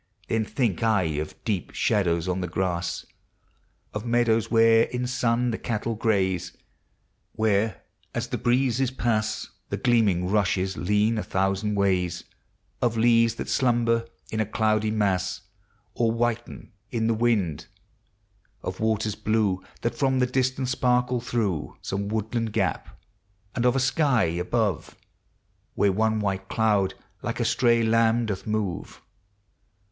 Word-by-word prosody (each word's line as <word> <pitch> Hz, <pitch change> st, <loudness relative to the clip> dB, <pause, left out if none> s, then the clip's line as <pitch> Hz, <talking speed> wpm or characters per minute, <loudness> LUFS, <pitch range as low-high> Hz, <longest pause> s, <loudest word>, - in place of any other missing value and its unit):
2 -, -, -2 dB
ID 110 Hz, -, +1 dB
Then -, -, -11 dB
think 115 Hz, -10 st, 0 dB
I 110 Hz, -4 st, +3 dB, 0.2 s
of 75 Hz, -, -7 dB
deep 100 Hz, -6 st, -2 dB
shadows 85 Hz, -4 st, +1 dB
on 90 Hz, 0 st, -1 dB
the 90 Hz, -, -2 dB
grass; 85 Hz, 0 st, -2 dB, 0.9 s
Of 105 Hz, -, -4 dB
meadows 120 Hz, -2 st, +2 dB
where 115 Hz, 0 st, +5 dB
in 125 Hz, 0 st, -3 dB
sun 125 Hz, -1 st, +1 dB
the 115 Hz, -, -3 dB
cattle 115 Hz, 0 st, -2 dB
graze, 95 Hz, -6 st, 0 dB, 0.8 s
Where, 110 Hz, -3 st, 0 dB, 0.3 s
as -, -, -2 dB
the -, -, -3 dB
breezes 125 Hz, +1 st, +2 dB
pass, 110 Hz, -4 st, -1 dB, 0.2 s
The -, -, -2 dB
gleaming 105 Hz, -7 st, +2 dB
rushes 95 Hz, -2 st, +1 dB
lean 105 Hz, +4 st, +1 dB
a -, -, -2 dB
thousand 95 Hz, +2 st, 0 dB
ways; 95 Hz, -3 st, +1 dB, 0.6 s
Of 115 Hz, -2 st, +1 dB
leaves 115 Hz, 0 st, +4 dB
that -, -, -5 dB
slumber 115 Hz, -2 st, +1 dB, 0.2 s
in 110 Hz, -, -2 dB
a 110 Hz, -, +2 dB
cloudy 110 Hz, 0 st, +1 dB
mas. 100 Hz, -4 st, 0 dB, 0.5 s
Or 115 Hz, -1 st, +1 dB
whiten 120 Hz, 0 st, -2 dB, 0.2 s
in 115 Hz, -2 st, -1 dB
the 115 Hz, -, +2 dB
wind; 110 Hz, -9 st, 0 dB, 1.0 s
of 90 Hz, 0 st, -5 dB
waters 110 Hz, -1 st, 0 dB
blue 105 Hz, -4 st, 0 dB, 0.2 s
Thai 120 Hz, -, +2 dB
from 130 Hz, +1 st, 0 dB
the 125 Hz, -, +3 dB
distance 130 Hz, 0 st, 0 dB
sparkle 125 Hz, -1 st, +1 dB
through 105 Hz, -9 st, -2 dB
Some 100 Hz, +1 st, -3 dB
woodland 110 Hz, +1 st, -2 dB
gap; 95 Hz, -8 st, -2 dB, 0.5 s
and 120 Hz, 0 st, +1 dB
of 125 Hz, -, +2 dB
a -, -, +2 dB
sky 130 Hz, -2 st, +2 dB
above. 90 Hz, +5 st, -1 dB, 0.8 s
Where 100 Hz, -, +3 dB
one 110 Hz, +2 st, +1 dB
white 95 Hz, -2 st, -2 dB
cloud 105 Hz, -4 st, +1 dB, 0.3 s
like -, -, -3 dB
a -, -, +1 dB
stray 115 Hz, -2 st, +3 dB
lamb 115 Hz, +1 st, +3 dB
doth 100 Hz, -2 st, -4 dB
move. 105 Hz, -5 st, -3 dB
110 Hz, 140 wpm, -25 LUFS, 100-120 Hz, 1.0 s, where